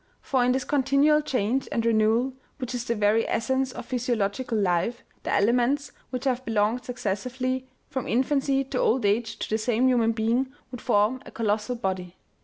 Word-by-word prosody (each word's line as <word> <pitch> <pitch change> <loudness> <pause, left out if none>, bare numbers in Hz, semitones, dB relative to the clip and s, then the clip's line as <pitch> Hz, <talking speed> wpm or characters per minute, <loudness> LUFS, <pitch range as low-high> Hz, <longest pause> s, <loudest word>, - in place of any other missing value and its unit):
For 260 -3 +1
in 250 - +3
this 260 +1 0
continual 285 +2 +3
change 255 -2 0
and 230 - 0
renewal, 230 +3 +2 0.2
which 255 -2 -5
is 245 -1 -3
the 235 - 0
very 210 +1 +2
essence 265 +2 0
of - - -8
physio 250 -1 -1
logical 225 +3 -1
life, 195 +4 0 0.2
the - - -3
elements, 245 +7 +2 0.2
which 255 +1 -4
have 255 -1 0
belonged 225 +1 +1
successive 245 0 -4
ly 255 0 -1 0.2
from 260 -2 -4
infancy 270 +2 +1
to 265 -1 -3
old 245 -1 +2
age 220 +2 +1
to - - -4
the 220 - 0
same 240 +3 +2
human 235 -3 +3
being, 235 +4 0 0.2
would 250 - -7
form 215 +5 +2
a - - -11
colossal 215 +1 -1
body. 185 -5 -3
245 Hz, 185 wpm, -26 LUFS, 220-260 Hz, 0.2 s, in